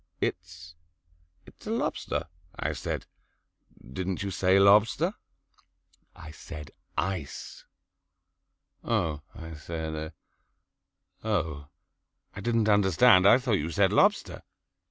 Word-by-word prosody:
"It's 85 -1 -4 0.7
it's - - -15
a - - -3
lobster," - - -2 0.3
I - - -2
said. - - -4 0.9
"Didn't 95 +4 -3
you 100 - -3
say 95 0 +3
lobster?" 100 +3 +4 1.0
"I 80 - -10
said 75 -2 -10 0.3
ice." 95 -7 -4 1.2
"Oh," 85 -10 -1
I 80 0 -8
said, 80 0 -5 1.1
"oh, 80 -9 -2 0.7
I 100 - -6
didn't 115 0 +1
understand. 100 0 +5
I 120 - +8
thought 125 -5 0
you 75 +2 -3
said 85 - +2
lobster." - - +2
90 Hz, 100 wpm, -28 LUFS, 80-100 Hz, 1.2 s, I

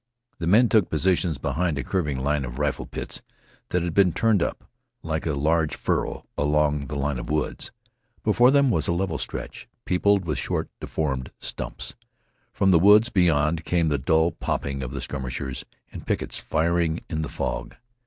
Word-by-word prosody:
The 85 - -2
men 110 +7 +6
took 110 -5 +3
positions 85 -1 +1
behind 80 +3 -1
a 70 - -2
curving 75 -2 -1
line 75 0 +1
of - - -6
rifle 75 -1 -1
pits - - -5 0.5
that 90 -1 0
had 85 -2 -2
been 95 -3 +4
turned 110 -5 +2
up, - - -2 0.4
like 80 0 -2
a 80 - 0
large 80 +2 +1
furrow, - - -2
along 75 -1 +1
the 75 - -5
line 70 -2 -1
of - - -7
woods. 75 0 -2 0.5
Before 125 +1 +5
them 140 -1 +4
was 80 -7 +1
a - - +2
level 85 -3 -1
stretch, - - -6 0.2
peopled 100 +1 +2
with 75 -5 -1
short, - - -2
deformed 65 -5 -2
stumps. - - -5 0.6
From 95 -1 +2
the 85 - +6
woods 105 +5 +6
beyond 80 -4 +2
came 85 -2 +1
the 75 - 0
dull 80 +5 +3
popping 70 -1 -3
of 65 - -4
the 70 +2 -5
skirmishers 65 0 -4 0.3
and - - -9
pickets, - - -2
firing 85 0 0
in 80 -1 -2
the 75 - -3
fog. - - -4
80 Hz, 175 wpm, -25 LUFS, 75-90 Hz, 0.6 s, men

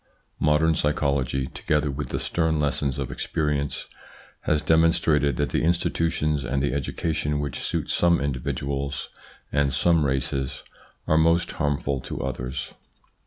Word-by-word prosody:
Modern 75 +2 +3
psychology, 70 -4 0
together 75 +2 0
with 70 +2 -4
the - - -2
stern 80 -2 0
lessons 70 -2 0
of 70 -3 -3
experience, 75 -2 -1 0.6
has 75 0 +2
demonstrated 80 -3 +3
that - - 0
the - - 0
institutions 80 -3 +1
and 70 +3 -1
the 70 - 0
education 75 +1 -1
which 70 -1 -3
suit - - -2
some 85 -1 +3
individuals 70 0 -2 0.4
and 70 -1 +2
some 80 +5 +3
races 65 -1 -1 0.4
are 80 - +3
most 85 +2 +3
harmful 70 -2 -1
to - - -6
others. 65 -1 -4
75 Hz, 130 wpm, -25 LUFS, 70-80 Hz, 0.6 s, Modern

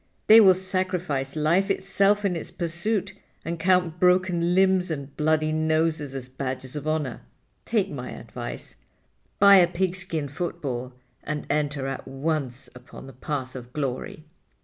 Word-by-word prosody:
They 225 +1 +9
will 190 -3 +7
sacrifice 180 -7 -1
life 170 +6 +2
itself 195 +1 +2
in 185 -3 +1
its 165 - -5
pursuit 175 +5 -2 0.3
and 170 0 -4
count 180 -1 +2
broken 180 -1 +3
limbs 190 -1 +3
and 140 -3 -5
bloody 155 0 +1
noses 155 -2 0
as 130 -2 -6
badges 130 0 -5
of 150 0 -5
honor. 155 -6 -2 0.4
Take - - 0
my - - -6
advice. - - -8 0.6
Buy 200 0 +8
a 175 -2 +6
pigskin 175 -5 -2
football 130 -5 -4 0.3
and 150 0 -4
enter 145 -2 -1
at 135 0 -5
once 135 -2 -3
upon 125 +1 -12
the 135 - -11
path 130 0 -5
of 125 -1 -9
glory." 140 +2 -4
155 Hz, 145 wpm, -25 LUFS, 140-185 Hz, 0.6 s, They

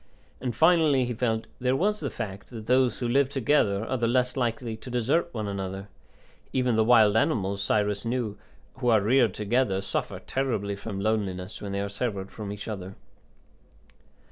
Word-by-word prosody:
And 125 -3 -2
finally, 155 -3 +4
he 120 - -2
felt, 110 -1 -1
there 125 +1 +1
was 210 +7 +1
the 140 - -3
fact 100 -3 -6
that 115 -3 -8
those 125 -1 +3
who 120 - -2
live 135 +2 +3
together 120 -7 +2
are 130 - -1
the 115 -1 +1
less 125 +1 +1
likely 115 -2 -1
to 125 - -10
desert 130 +8 +1
one 110 -6 -4
another; 95 0 -5 0.6
even 125 -3 +1
the 110 - +4
wild 110 -3 +5
animals, 100 -3 +1
Cyrus 105 0 0
knew, 115 -3 -2 0.4
who 125 -2 0
are 110 -2 +6
reared 115 0 +3
together 105 -2 +1
suffer 95 - -3
terribly 110 -7 -2
from 100 0 -6
loneliness 100 -3 -2
when 100 - -5
they 100 0 -1
are 100 - -2
severed 100 -1 -3
from 105 -2 -6
each 105 0 -7
other. 95 -3 -6
110 Hz, 175 wpm, -27 LUFS, 100-125 Hz, 0.6 s, are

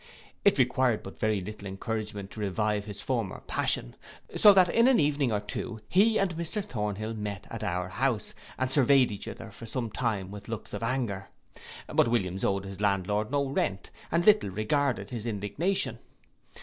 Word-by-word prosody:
It 200 - +5
required 125 -3 +2
but - - -10
very 110 -2 +1
little 100 +1 -7
encouragement 105 0 -4
to - - -9
revive 105 +1 0
his 100 -1 -7
former 115 -7 -2
passion; - - -1 0.4
so 210 - +8
that 190 -2 +6
in 230 +7 +4
an 265 - +5
evening 145 -4 +2
or 105 - +1
two 110 +2 -5
he 215 +4 +4
and 185 -4 +1
Mr 170 +5 -2
Thornhill 110 - -3
met 105 -3 -5
at - - -5
our 90 +1 -1
house, 120 +1 -1 0.2
and 130 0 -1
surveyed 135 -2 +5
each 100 - -6
other - - -8
for 115 - -10
some 115 0 -3
time 105 -5 -2
with 100 0 -9
looks 115 -2 -6
of 105 - -4
anger: 115 -5 -2 0.6
but - - +2
Williams 95 -5 0
owed 100 0 0
his 95 0 -7
landlord 105 +1 +1
no 140 +1 +1
rent, 95 -7 -2 0.2
and 170 +1 +2
little 210 - +5
regarded 110 +1 0
his 120 -2 -3
indignation. 115 - -1
110 Hz, 175 wpm, -29 LUFS, 100-135 Hz, 0.6 s, so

